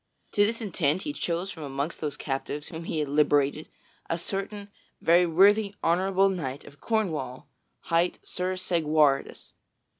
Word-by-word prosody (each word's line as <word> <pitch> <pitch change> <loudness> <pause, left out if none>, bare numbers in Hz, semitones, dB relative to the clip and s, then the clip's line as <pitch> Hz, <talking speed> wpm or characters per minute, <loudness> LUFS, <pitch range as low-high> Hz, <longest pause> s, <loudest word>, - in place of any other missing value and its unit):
To 205 - +4
this 230 +3 0
intent 175 -4 0
he 295 - -3
chose 175 - -2
from 160 - -10
amongst 140 +2 -4
those 150 -2 -3
captives 145 +1 -4
whom 165 0 -7
he 165 - -3
had 150 -1 0
liberated 145 +1 +2 0.4
a 165 - 0
certain 200 +3 -4 0.3
very 175 +2 +4
worthy 200 +4 +4
honorable 190 +3 +3
knight 145 -8 -3
of 145 -1 -15
Cornwall 150 - -2 0.3
hight 170 +1 +1
Sir 185 +1 -2
Segwarides. 155 -6 +1
165 Hz, 145 wpm, -27 LUFS, 150-195 Hz, 0.4 s, To